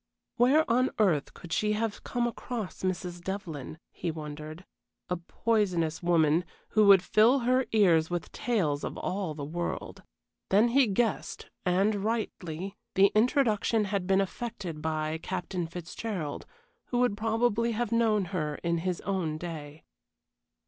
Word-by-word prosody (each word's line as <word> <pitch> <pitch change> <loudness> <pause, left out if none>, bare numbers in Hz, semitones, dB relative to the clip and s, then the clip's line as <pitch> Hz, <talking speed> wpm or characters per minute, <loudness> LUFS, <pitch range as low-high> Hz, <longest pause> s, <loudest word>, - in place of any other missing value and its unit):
Where 280 +6 +4
on 255 +3 +3
earth 175 -10 +2
could 170 -2 -7
she 210 +5 +1
have 215 0 -2
come 240 -1 -1
across 235 -3 -5
Mrs. 180 -1 -3
Devlyn? 170 -7 -5
he 175 - -4
wondered. 155 +2 -7 0.4
A 180 - 0
poisonous 175 -3 0
woman, 165 -1 +3 0.3
who 215 -1 +4
would 195 -2 +8
fill 235 +7 +4
her 255 +2 +2
ears 170 -7 +4
with 175 -1 -3
tales 170 -12 0
of - - -4
all 185 -5 -3
the 145 -2 -5
world. 170 +4 -4 0.5
Then 210 +5 +5
he 265 +1 +4
guessed, 215 +2 -1 0.2
and 195 +3 +2
rightly, 195 -5 -3 0.2
the 195 +1 +6
introduction 225 -2 +2
had 195 -2 -2
been 195 0 +4
effected 195 -6 -5
by 155 0 -2
Captain 180 -1 -3
Fitzgerald, 175 -1 -5 0.4
who 245 - -2
would 245 -4 +2
probably 225 +1 +1
have 235 +1 -2
known 220 -4 +3
her 150 -4 -1
in 170 -1 +1
his 180 +1 -2
own 180 -5 -2
day. 155 -3 -7
190 Hz, 140 wpm, -29 LUFS, 165-225 Hz, 0.5 s, would